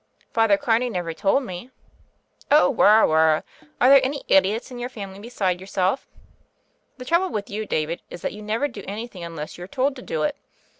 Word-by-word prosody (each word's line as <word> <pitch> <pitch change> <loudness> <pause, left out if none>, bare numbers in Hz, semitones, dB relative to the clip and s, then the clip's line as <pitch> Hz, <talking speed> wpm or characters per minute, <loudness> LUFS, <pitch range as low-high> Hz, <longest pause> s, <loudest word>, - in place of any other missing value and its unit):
"Father 225 -3 +4
Carney 235 +3 +1
never 175 -6 -3
told 200 +10 +1
me." 185 +1 -7 0.8
"Oh, 295 +2 +5
wirra, 215 -1 +6
wirral 160 0 +3 0.4
Are 250 - +5
there 275 0 +7
any 280 +2 -2
idiots 200 +6 +2
in 245 - -7
your 245 +1 -4
family 195 -5 -8
beside 195 -5 -2
yourself? 190 +5 -1 0.9
The 250 - -9
trouble 340 +6 +2
with 205 -2 -4
you, 215 +1 -4
David, 155 +2 -2
is 175 - -10
that - - -2
you 210 - -9
never 220 +7 -1
do 205 -8 -10
anything 210 -2 -6
un 170 -1 -7
less 150 +2 -7
you're 180 - -7
told 270 +5 0
to - - -8
do 155 -9 -3
it. - - 0
210 Hz, 195 wpm, -23 LUFS, 180-250 Hz, 0.9 s, there